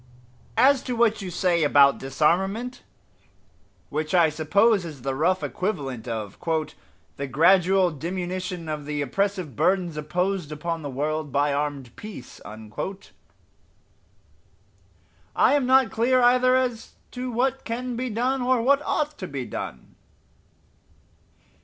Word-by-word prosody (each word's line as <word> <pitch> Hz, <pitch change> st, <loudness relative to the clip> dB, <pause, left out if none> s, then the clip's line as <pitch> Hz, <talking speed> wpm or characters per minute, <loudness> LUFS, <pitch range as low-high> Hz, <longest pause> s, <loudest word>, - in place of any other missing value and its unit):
As 265 Hz, +2 st, +5 dB
to 250 Hz, -, -2 dB
what 225 Hz, -2 st, +2 dB
you 190 Hz, -, -5 dB
say 175 Hz, -1 st, +1 dB
about 140 Hz, -1 st, +5 dB
disarmament 190 Hz, -, 0 dB, 1.1 s
which 155 Hz, +4 st, -1 dB
I 170 Hz, -3 st, +5 dB
suppose 200 Hz, +7 st, +2 dB
is 150 Hz, -7 st, -9 dB
the 135 Hz, -, -1 dB
rough 180 Hz, +7 st, +1 dB
equivalent 135 Hz, -, -3 dB
of 110 Hz, -4 st, -5 dB, 0.8 s
"the 140 Hz, -, -3 dB
gradual 180 Hz, +5 st, +4 dB
diminution 180 Hz, +2 st, -4 dB
of 150 Hz, -2 st, -4 dB
the 150 Hz, -1 st, -2 dB
oppressive 185 Hz, -, -2 dB
burdens 180 Hz, -, +1 dB
imposed 175 Hz, +2 st, -2 dB
upon 165 Hz, +2 st, -3 dB
the 145 Hz, -, -5 dB
world 150 Hz, +2 st, -2 dB
by 145 Hz, +1 st, +1 dB
armed 140 Hz, -4 st, -3 dB
peace" 210 Hz, -, -10 dB
I 110 Hz, +1 st, -10 dB, 2.9 s
am 285 Hz, -3 st, +2 dB
not 260 Hz, -2 st, +4 dB
clear 255 Hz, +3 st, +2 dB
either 255 Hz, +1 st, +4 dB
as 250 Hz, -3 st, -1 dB, 0.2 s
to 250 Hz, 0 st, -5 dB
what 260 Hz, +3 st, 0 dB
can 245 Hz, +2 st, -4 dB
be 255 Hz, +2 st, -3 dB
done 250 Hz, +4 st, 0 dB
or 250 Hz, 0 st, +2 dB
what 275 Hz, +5 st, +3 dB
ought 300 Hz, 0 st, -2 dB
to 185 Hz, -, -5 dB
be 135 Hz, -5 st, -5 dB
done. 65 Hz, -, -7 dB
180 Hz, 130 wpm, -25 LUFS, 150-235 Hz, 2.9 s, As